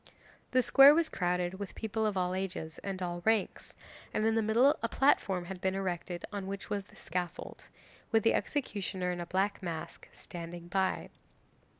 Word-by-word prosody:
'The 255 0 +3
square 275 +3 +8
was 330 -1 +2
crowded 180 0 -1
with 200 - -6
people 220 0 -1
of 205 -2 -1
all 180 0 0
ages 185 -4 -4
and 190 -2 -3
all 175 -1 -3
ranks, 220 -2 0 0.4
and 215 - +1
in 225 - +3
the 225 - +2
middle 235 +7 +4
a 230 - -1
platform 195 -10 +2
had 185 0 -7
been 190 0 0
erected 180 -2 -3
on 200 -2 -4
which 195 0 -6
was 200 -1 -1
the - - -20
scaffold, 175 0 -5 0.5
with 225 -2 +3
the 225 - +4
executioner, 195 -9 -2
in 175 -1 -4
a 170 - -6
black 195 +3 0
mask, 170 -3 -6
standing 170 0 -8
by. 190 +1 -1
190 Hz, 180 wpm, -31 LUFS, 180-220 Hz, 0.5 s, square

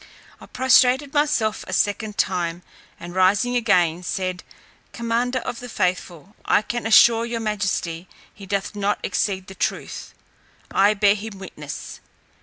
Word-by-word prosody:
I - - -13
prostrated 260 +2 +3
myself 290 -8 +1
a 185 - -6
second 205 +2 -1
time, 175 -2 -1 0.4
and 175 +1 -9
rising 195 +7 +2
again, 180 -8 +2
said, 185 0 -3 0.5
"Commander 235 +2 -1
of 235 -1 -4
the 245 - -8
faithful, 185 -1 -3
I - - +2
can 240 0 -3
assure 230 +1 +6
your 235 0 -3
majesty 195 -5 -2 0.3
he 200 -2 -12
doth 200 +1 -2
not 205 0 0
exceed 190 0 -1
the 190 - -10
truth. - - -4 0.6
I 205 +2 +4
bear 200 0 +4
him 210 0 -7
witness. 150 -6 -8
205 Hz, 140 wpm, -22 LUFS, 185-230 Hz, 0.6 s, assure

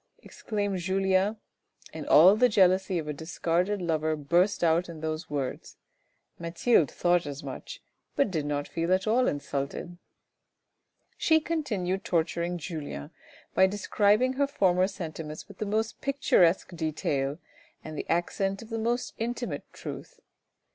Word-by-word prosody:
" - - -47
exclaimed 205 -3 -3
Julien, 190 +3 +1 0.6
and 155 -2 -6
all 180 +7 +8
the 250 +3 +4
jealousy 190 -2 +3
of 155 -2 -3
a 150 - -2
discarded 175 +5 -1
lover 160 -2 0
burst 175 +7 +1
out 170 +2 +2
in 165 -2 -8
those 160 +1 -4
words, 140 -3 -4 0.6
Mathilde 170 - +2
thought 175 -2 +1
as 145 +1 -6
much, - - -8 0.3
but 280 -8 +2
did 155 -4 -2
not 145 -1 -2
feel 165 +1 -2
at 185 - -3
all 240 +4 +3
insulted. 145 +4 -3 1.2
She 320 -1 +4
continued 210 - -2
torturing 170 +1 0
Julien 150 - -6 0.4
by 190 - +5
describing 205 +5 +2
her 280 +1 +1
former 185 -9 +2
sentiments 160 -5 -7
with 200 - -14
the 215 - -2
most 220 +2 -1
picturesque 190 -11 +2
detail 150 -3 -1 0.5
and 155 0 -7
the - - -5
accent 195 +4 0
of 225 - -14
the 225 - -2
most 240 +2 -1
intimate 240 +1 -4
truth. - - -8
180 Hz, 140 wpm, -28 LUFS, 160-205 Hz, 1.2 s, all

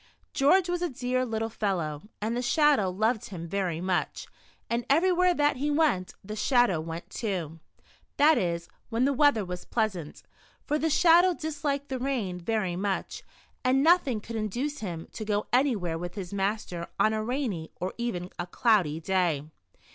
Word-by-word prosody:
George 345 +7 +4
was 355 0 -1
a 350 - 0
dear 255 0 -1
little 225 0 -1
fel 205 -3 -1
low, 155 -3 -4 0.2
and 220 +3 -2
the 245 - -1
Shadow 275 - +3
loved 215 +4 0
him 170 -4 -7
very 180 -2 -1
much, 180 0 -1 0.4
and 235 +1 -1
everywhere 360 +4 +4
that 290 -2 +2
he 290 +3 -1
went, 290 - +1
the 210 +2 -6
Shadow 240 - +3
went 165 +1 -7
too. 175 -8 -3 0.6
That 305 +2 +6
is, 170 -5 -1 0.2
when 235 +2 +1
the 280 - +2
weather 275 -7 +3
was 180 0 -6
pleasant, 195 -9 -2 0.4
for 300 - 0
the 320 - +1
Shadow 345 +3 +5
disliked 290 -3 -3
the 260 -1 -3
rain 240 -9 -2
very 190 -2 -1
much 195 +1 -2 0.4
and 265 +1 +3
nothing 315 -8 +4
could 230 +1 -6
induce 245 +8 -2
him 170 -5 -5
to 220 - -6
go 210 -1 -1
anywhere 215 - +1
with 175 +2 -6
his 195 -2 -6
master 195 -3 -2
on 215 - +4
a 215 0 -1
rainy, 230 - -2
or 185 - -3
even 190 -7 -3
a 175 - -3
cloudy 180 -7 +2
day. 170 -5 0
220 Hz, 170 wpm, -28 LUFS, 180-275 Hz, 0.6 s, That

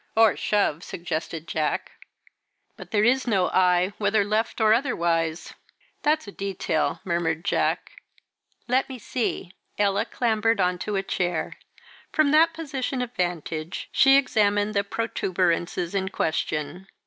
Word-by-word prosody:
'" - - -41
"Or 225 -2 +6
shove," 195 -6 0
suggested 165 -1 -5
Jack. 155 -2 -2 0.8
"But - - -11
there 210 -2 +2
is 255 +3 +3
no 195 -6 +2
eye 180 +1 +3
whether 205 0 +2
left 215 +3 -1
or 215 -1 +5
otherwise." 170 - 0 0.5
"That's 300 -4 +1
a - - -7
detail," 190 -7 -2
murmured 170 -2 -1
Jack. - - 0 0.8
"Let 255 +3 +1
me 260 - -6
see." 220 -5 -3 0.2
Ella 205 +1 +2
clambered 225 -2 +1
on 180 -1 +1
to 210 +2 -3
a 195 - 0
chair. 175 -3 -2 0.6
From 310 -3 +3
that 320 +2 +5
position 275 -5 -3
of 245 0 -7
vantage 170 -2 -3
she 270 0 +6
examined 210 -5 +2
the 200 -1 +1
protuberances 180 -5 -1
in 190 -1 -1
question. 160 +1 -2
200 Hz, 135 wpm, -25 LUFS, 175-230 Hz, 0.8 s, Or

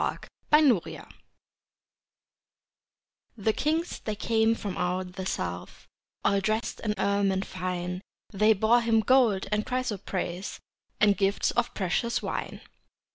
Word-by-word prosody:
Christmas 285 - +5
Carol - - -9 2.3
The 215 +1 +1
kings 320 +7 -1
they 215 - -4
came 225 +1 +2
from 200 -4 -5
out 180 +1 -2
the 190 0 -5
south, 90 - -5 0.4
All 200 - +3
dressed 215 +3 -1
in 210 -2 -2
ermine 200 -1 +1
fine, 180 -1 -4 0.3
They 215 +2 +5
bore 220 +4 +3
Him 225 -1 +3
gold 235 -6 +3
and 210 0 +1
chrysoprase, 200 -7 -3 0.4
And 205 -1 +5
gifts 195 0 +1
of 240 0 -1
precious 205 +5 0
wine. - - -4
205 Hz, 120 wpm, -27 LUFS, 190-230 Hz, 2.3 s, Christmas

